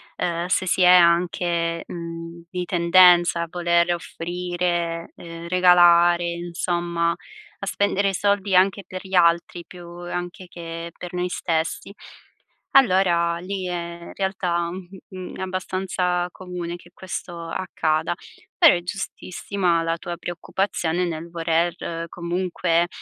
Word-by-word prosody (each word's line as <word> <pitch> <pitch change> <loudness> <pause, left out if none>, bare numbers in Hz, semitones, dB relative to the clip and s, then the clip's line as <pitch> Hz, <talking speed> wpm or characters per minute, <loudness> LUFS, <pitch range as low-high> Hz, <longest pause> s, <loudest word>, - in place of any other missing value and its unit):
ehm, 170 0 -2
se 185 - +1
si 185 - +1
è 180 - +7
anche, 170 -1 +3
mhmm, 170 0 -8
di 180 -1 -3
tendenza 175 -1 +5
a - - -5
voler 170 0 +2
offrire, 175 0 -3
ehm, 170 0 -9
regalare, 175 -1 +5
insomma 170 0 -1
a 425 - -11
spendere 200 -1 +1
i - - -3
soldi 200 -1 +1
anche 195 +2 +3
per 185 0 -7
gli 190 - -11
altri, 170 0 +3
più 175 -1 -11
anche 175 +1 -6
che 165 -1 -7
per 180 0 -8
noi 180 0 -1
stessi. 165 +3 -2 0.8
Allora, 180 -8 +4
lì, 185 +1 -4
ehm, 170 -1 -6
realtà, 180 -3 -1
mhmm, 185 0 -9
è - - -6
abbastanza 185 -1 -1
comune 180 -2 -6
che 175 0 -15
questo 175 -2 -6
accada. 160 -2 -1 0.4
Però 335 -5 +8
è 175 - -1
giustissima 180 -1 -2
la 165 0 0
tua 175 -2 -5
preoccupazione 175 0 -2
nel 165 0 -5
voler 165 0 0 0.3
comunque, 175 -1 0
175 Hz, 125 wpm, -23 LUFS, 170-185 Hz, 0.8 s, Però